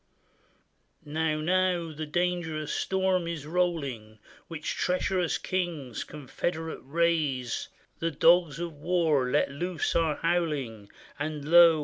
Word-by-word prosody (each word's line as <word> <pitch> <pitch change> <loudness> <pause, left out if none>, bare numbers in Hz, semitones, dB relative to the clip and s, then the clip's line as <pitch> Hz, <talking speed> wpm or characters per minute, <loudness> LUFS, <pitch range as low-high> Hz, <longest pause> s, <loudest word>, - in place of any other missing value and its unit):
Now, 155 +1 0
now 180 0 +1
the 155 0 -5
dangerous 165 -2 -1
storm 190 -2 +1
is 165 -4 -4
rolling, 145 -11 -1 0.3
Which 160 -2 -4
treacherous 180 -1 0
kings 165 -10 -3
confederate 160 +3 -4
raise; 145 -4 0 0.3
The 165 - 0
dogs 165 0 +4
of 170 -1 -4
war, 150 -4 +1
let 125 - +2
loose, 175 +3 -2
are 160 -3 +2
howling. 145 -12 -1 0.3
And 150 -1 -3
lo! 170 -1 +8
160 Hz, 110 wpm, -28 LUFS, 145-175 Hz, 0.3 s, lo